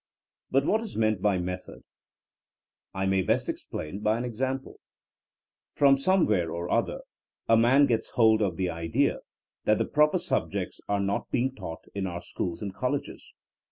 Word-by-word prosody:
But 135 +1 +2
what 220 +6 +2
is 225 - -7
meant 110 -3 +1
by 100 -2 +2
method! 90 +1 -5 1.1
I 95 +1 -2
may 95 0 +2
best - - 0
explain 80 +6 -5
by 105 +1 +1
an 120 - -3
example. 130 +3 -3 1.0
From 140 -1 +6
somewhere 135 - +2
or 85 +1 -4
other, - - 0 0.5
a 115 - +6
man 125 +5 +5
gets 115 -5 0
hold 110 -2 +4
of 95 -5 0
the 95 - 0
idea 85 -1 0 0.5
that 105 - +4
the - - 0
proper 150 0 +3
subjects - - -2
are 100 0 +1
not 100 0 -1
be 120 - +1
ing 130 0 -1
taught 80 -9 -7
in 100 -1 -2
our 85 -1 -5
schools 85 +2 -4
and 100 -2 -4
colleges. 130 +7 -3
105 Hz, 165 wpm, -27 LUFS, 95-130 Hz, 1.1 s, From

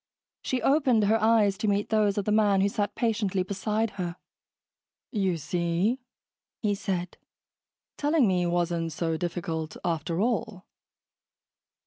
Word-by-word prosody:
She 255 -2 -2
opened 270 -6 +3
he 210 - +3
eyes 220 -3 +3
to 215 - -1
meet 205 0 +1
those 210 -2 +2
of 205 - -1
the 210 - 0
man 205 -2 +4
who 200 - +3
sat 205 0 -2
patiently 210 -5 0
beside 210 +3 -1
her. 175 -1 -3 1.0
"You 190 -6 0
see," 170 - 0 0.6
he 210 -1 +2
said, 185 -3 -3 0.8
"telling 295 -4 +3
me 180 -2 +1
wasn't 170 -1 -1
so 165 +1 -1
difficult, 165 -1 -3
after 165 0 -1
all." 220 -3 -1
200 Hz, 130 wpm, -27 LUFS, 175-220 Hz, 1.0 s, man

